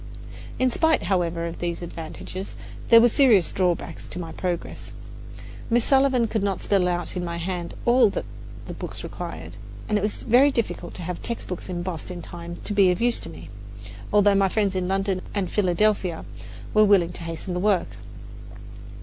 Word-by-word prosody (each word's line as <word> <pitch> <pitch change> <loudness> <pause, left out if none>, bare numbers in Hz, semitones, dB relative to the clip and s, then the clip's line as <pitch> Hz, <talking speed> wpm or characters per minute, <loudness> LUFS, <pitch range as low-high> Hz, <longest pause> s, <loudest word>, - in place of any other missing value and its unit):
In 255 0 +2
spite, 320 +5 +2
however, 170 -3 0
of 170 - -6
these 175 0 -3
advantages, 170 +3 -7 0.3
there 230 - +9
were 235 - +6
serious 230 -7 +4
drawbacks 175 -3 -1
to - - -8
my 165 -2 -5
progress. 180 -1 -4 0.8
Miss 240 0 +2
Sullivan 265 -3 +4
could 220 -1 -1
not 195 -1 -1
spell 195 -3 +2
out 175 0 -2
in 180 - -2
my 170 -1 -3
hand 175 0 -4
all 240 -2 +5
that - - -4 0.4
the - - -6
books - - -7
required, - - -7 0.3
and 210 -1 +1
it - - -5
was 210 +1 -2
very 255 +5 +5
difficult 230 -9 -3
to 180 - -6
have 180 0 -5
textbooks 190 -6 -4
embossed 175 -2 -4
in 175 -2 -7
time 170 0 -8
to 210 - -1
be 200 -2 +5
of 180 - +1
use 240 0 +3
to - - -8
me, 165 - -11 0.6
although 205 -1 +5
my 195 -1 +3
friends 200 -1 0
in 185 -1 -1
London 195 0 0
and 195 -3 -1
Philadelphia 190 -2 +1 0.5
were 215 - +6
willing 195 -5 +4
to 175 - -6
hasten 165 +2 -4
the 180 - -1
work. 195 -1 +2
190 Hz, 180 wpm, -24 LUFS, 175-215 Hz, 0.8 s, there